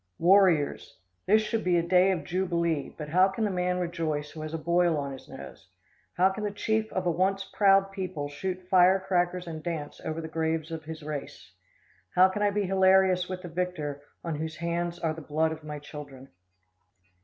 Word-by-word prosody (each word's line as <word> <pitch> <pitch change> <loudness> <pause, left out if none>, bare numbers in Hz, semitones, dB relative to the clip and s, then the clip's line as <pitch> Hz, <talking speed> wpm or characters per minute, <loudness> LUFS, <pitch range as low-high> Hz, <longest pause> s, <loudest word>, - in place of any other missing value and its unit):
Warriors! 175 -5 +3 0.3
This 215 +3 +5
should 220 +1 -2
be 180 -1 +2
a 170 - +2
day 180 +2 +4
of 185 -3 0
jubilee, 170 -4 -1
but 150 -1 -6
how 185 +4 +5
can 195 +3 -3
the 210 - +1
man 180 0 0
rejoice 160 -4 -2
who 155 - -8
has 155 0 -5
a 165 - -2
boil 170 0 +2
on 140 -1 -3
his 135 - -11
nose? 115 -7 -11 0.5
How 185 +2 +4
can 210 +2 -5
the 210 - 0
chief 220 +2 -1
of 185 - -2
a 175 - +2
once 190 +3 +1
proud 195 -1 +3
people 185 -7 -4
shoot 185 +5 -5
firecrackers 185 -1 +3
and 160 -2 -6
dance 155 -3 -5
over 160 +1 -3
the 160 - -5
graves 160 0 -2
of 160 -1 -6
his 160 0 -8
race? 150 -2 -7 0.6
How 185 +1 +7
can 205 +2 -4
I 205 - +4
be 205 0 0
hilarious 190 -1 +3
with 185 0 -5
the - - -6
victor, 160 -5 -3 0.2
on 165 - -3
whose 160 +1 -4
hands 170 +1 -2
are 165 -2 -1
the 160 - -9
blood 155 +2 0
of 160 -1 -7
my 150 -1 -6
children? 145 -2 -10
175 Hz, 200 wpm, -28 LUFS, 155-190 Hz, 0.6 s, How